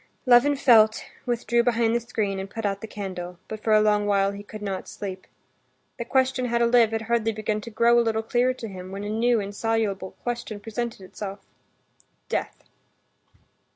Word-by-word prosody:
Levin 250 Hz, +3 st, +6 dB
felt, 220 Hz, -5 st, +5 dB, 0.2 s
withdrew 235 Hz, -1 st, +1 dB
behind 235 Hz, -1 st, +2 dB
the -, -, +3 dB
screen, 215 Hz, -4 st, -2 dB
and 195 Hz, 0 st, -5 dB
put 225 Hz, +1 st, -5 dB
out 200 Hz, -1 st, -1 dB
the 220 Hz, -, -6 dB
candle, 185 Hz, -4 st, -6 dB
but 215 Hz, -1 st, -7 dB
for 220 Hz, -, +1 dB
a 215 Hz, -, +7 dB
long 210 Hz, -1 st, +2 dB
while 200 Hz, -1 st, +2 dB
he 200 Hz, 0 st, -8 dB
could 210 Hz, +1 st, -10 dB
not 195 Hz, -2 st, -4 dB
sleep. 190 Hz, -2 st, -7 dB, 0.7 s
The 235 Hz, -, -3 dB
question 260 Hz, 0 st, +1 dB
how 235 Hz, -1 st, 0 dB
to 235 Hz, -, +3 dB
live 235 Hz, -1 st, +5 dB
had 225 Hz, 0 st, -2 dB
hardly 225 Hz, -1 st, +1 dB
begun 215 Hz, 0 st, -2 dB
to 230 Hz, -, -8 dB
grow 235 Hz, +2 st, +4 dB
a -, -, +5 dB
little 225 Hz, -1 st, 0 dB
clearer 245 Hz, +3 st, +1 dB
to 230 Hz, -, -7 dB
him, 185 Hz, -2 st, -8 dB
when 200 Hz, +1 st, -5 dB
a 205 Hz, -, -4 dB
new, 230 Hz, +2 st, +2 dB
insoluble 205 Hz, -1 st, -2 dB
question 235 Hz, -3 st, -4 dB
presented 225 Hz, +1 st, -4 dB
itself—death. 195 Hz, +1 st, -8 dB
220 Hz, 185 wpm, -25 LUFS, 200-235 Hz, 0.7 s, a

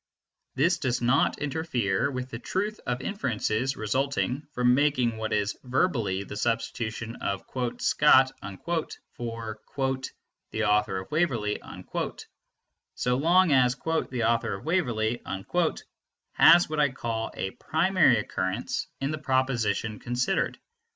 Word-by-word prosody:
This 165 Hz, +6 st, +2 dB
does 125 Hz, -3 st, 0 dB
not 125 Hz, +3 st, +2 dB
interfere 140 Hz, -, -1 dB
with 130 Hz, -1 st, -5 dB
the 115 Hz, -, -5 dB
truth 205 Hz, -, -2 dB
of 125 Hz, 0 st, -1 dB
inferences 130 Hz, -, -1 dB
resulting 135 Hz, +5 st, -1 dB
from 125 Hz, -2 st, +3 dB
making 130 Hz, -4 st, +2 dB
what 110 Hz, 0 st, -3 dB
is 105 Hz, -1 st, 0 dB
verbally 125 Hz, -, 0 dB
the 105 Hz, -, -8 dB
substitution 115 Hz, 0 st, -2 dB
of 100 Hz, -1 st, -3 dB, 0.3 s
"Scott" 135 Hz, -3 st, +5 dB, 0.8 s
for 115 Hz, -2 st, -6 dB, 0.9 s
"the 110 Hz, -, -2 dB
author 105 Hz, -2 st, +2 dB
of 95 Hz, 0 st, -7 dB
Waverley," 130 Hz, -11 st, 0 dB, 1.3 s
so 125 Hz, 0 st, +1 dB
long 170 Hz, +5 st, +4 dB
as 125 Hz, -2 st, +4 dB
"the 135 Hz, -4 st, -2 dB
author 115 Hz, -2 st, +1 dB
of 95 Hz, -, -10 dB
Waverley" 120 Hz, -10 st, 0 dB, 1.1 s
has 175 Hz, +1 st, +7 dB
what 155 Hz, 0 st, -3 dB
I 145 Hz, -1 st, +4 dB
call 115 Hz, -3 st, -3 dB
a 95 Hz, -, -3 dB
primary 165 Hz, -, +3 dB
occurrence 100 Hz, +1 st, -2 dB
in 135 Hz, +2 st, -1 dB
the 155 Hz, -, -3 dB
proposition 120 Hz, -6 st, 0 dB
considered. 125 Hz, +9 st, -1 dB
125 Hz, 120 wpm, -27 LUFS, 110-145 Hz, 1.3 s, has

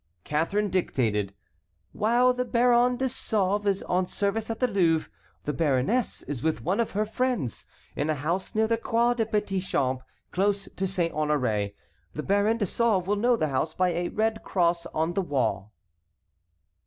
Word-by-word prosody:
Catharine 195 Hz, +7 st, 0 dB
dictated: 105 Hz, -, 0 dB, 0.6 s
"While 240 Hz, +4 st, +3 dB
the 250 Hz, 0 st, -1 dB
Baron 245 Hz, 0 st, +3 dB
de 265 Hz, -, 0 dB
Sauve 205 Hz, -4 st, 0 dB
is 195 Hz, -1 st, +1 dB
on 180 Hz, 0 st, 0 dB
service 210 Hz, +3 st, -1 dB
at 225 Hz, -, -3 dB
the 250 Hz, -, +3 dB
Louvre 170 Hz, -7 st, +1 dB, 0.3 s
the 150 Hz, -, -2 dB
baroness 155 Hz, -, +1 dB
is 140 Hz, -4 st, -5 dB
with 160 Hz, +2 st, -1 dB
one 185 Hz, +7 st, 0 dB
of 230 Hz, -, +1 dB
her 215 Hz, -, +2 dB
friends, 230 Hz, -, -2 dB, 0.3 s
in 145 Hz, +2 st, -1 dB
a 155 Hz, -, +2 dB
house 170 Hz, -, -2 dB
near 220 Hz, +1 st, +3 dB
the 230 Hz, +1 st, +1 dB
Croix 235 Hz, +1 st, +2 dB
des 225 Hz, -3 st, -1 dB
Petits 205 Hz, -3 st, -1 dB
Champs, 130 Hz, -1 st, 0 dB, 0.3 s
close 200 Hz, +1 st, 0 dB
to 190 Hz, -, -1 dB
Saint 175 Hz, -3 st, -1 dB
Honoré. 125 Hz, -10 st, 0 dB, 0.4 s
The 150 Hz, -, -3 dB
Baron 205 Hz, +3 st, +2 dB
de 210 Hz, -, 0 dB
Sauve 205 Hz, -2 st, +1 dB
will 205 Hz, +2 st, +1 dB
know 240 Hz, +4 st, +3 dB
the 155 Hz, -9 st, 0 dB
house 140 Hz, +4 st, -1 dB
by 185 Hz, 0 st, +2 dB
a 175 Hz, 0 st, -1 dB
red 220 Hz, 0 st, 0 dB
cross 170 Hz, -2 st, 0 dB
on 160 Hz, +2 st, -1 dB
the 195 Hz, -, +1 dB
wall." 115 Hz, -, -1 dB
190 Hz, 175 wpm, -27 LUFS, 155-220 Hz, 0.6 s, While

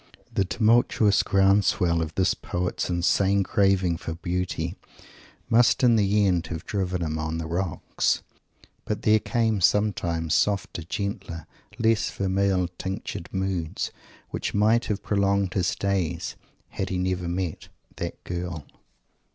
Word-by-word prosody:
The 95 Hz, -, +1 dB
tumultuous 110 Hz, 0 st, +3 dB
ground 100 Hz, +1 st, +4 dB
swell 85 Hz, -4 st, +1 dB
of 80 Hz, -1 st, -4 dB
this 95 Hz, -, +3 dB
poet's 90 Hz, +1 st, -3 dB
insane 95 Hz, +3 st, +2 dB
craving 95 Hz, -3 st, +2 dB
for 80 Hz, -2 st, -5 dB
Beauty 85 Hz, -1 st, -2 dB, 0.7 s
must 125 Hz, +3 st, +4 dB
in 120 Hz, -2 st, +6 dB
the 105 Hz, -1 st, +3 dB
end 90 Hz, -3 st, +1 dB
have 80 Hz, -1 st, -6 dB
driven 95 Hz, -3 st, -2 dB
him 80 Hz, -1 st, -2 dB
on 80 Hz, 0 st, -2 dB
the 80 Hz, -, -4 dB
rocks; 85 Hz, +1 st, -1 dB, 0.6 s
but 105 Hz, -, -3 dB
there 110 Hz, 0 st, +5 dB
came 110 Hz, -3 st, 0 dB
sometimes 85 Hz, -5 st, +1 dB
softer, 100 Hz, -4 st, +1 dB
gentler, 95 Hz, -1 st, -4 dB, 0.3 s
less 115 Hz, -1 st, +2 dB
"vermeil 95 Hz, -1 st, +1 dB
tinctured" 95 Hz, -3 st, -5 dB
moods, 95 Hz, -4 st, -2 dB, 0.4 s
which -, -, -3 dB
might 110 Hz, +3 st, +3 dB
have 105 Hz, -1 st, -3 dB
prolonged 100 Hz, -2 st, +1 dB
his 95 Hz, -2 st, 0 dB
days, 90 Hz, -4 st, -1 dB, 0.3 s
had 95 Hz, -, -3 dB
he 95 Hz, -, -1 dB
never 90 Hz, -1 st, -1 dB
met 90 Hz, -1 st, -3 dB, 0.3 s
"that -, -, -5 dB
girl." 85 Hz, -4 st, -5 dB
95 Hz, 135 wpm, -25 LUFS, 85-100 Hz, 0.7 s, in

